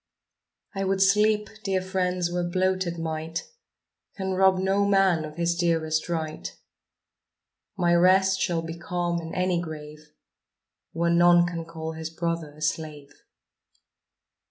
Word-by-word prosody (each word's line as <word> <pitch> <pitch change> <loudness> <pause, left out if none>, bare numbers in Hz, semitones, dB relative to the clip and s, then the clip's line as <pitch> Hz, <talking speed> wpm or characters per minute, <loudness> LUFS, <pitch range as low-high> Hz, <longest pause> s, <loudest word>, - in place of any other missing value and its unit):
I 195 -1 -2
would 195 0 0
sleep, 210 +2 +3 0.2
dear 195 -1 0
friends, 185 -2 -1
where 175 0 -1
bloated 185 0 0
might 160 +1 -4 0.7
Can 190 -1 -2
rob 190 0 +4
no 195 +2 +1
man 195 -5 +3
of 150 0 -8
his 170 0 0
dearest 165 -2 0
right; 160 -2 -3 1.3
My 175 -2 +2
rest 190 +2 +4
shall 170 -3 0
be 165 +1 -7
calm 175 -1 -2
in 165 0 -7
any 180 -1 +1
grave 150 -2 -9 0.8
Where 170 +1 0
none 175 0 +5
can 170 -2 -4
call 160 -1 -6
his 160 0 -6
brother 165 -2 -3
a 155 - -8
slave. 150 -2 -3
175 Hz, 130 wpm, -26 LUFS, 160-185 Hz, 1.3 s, none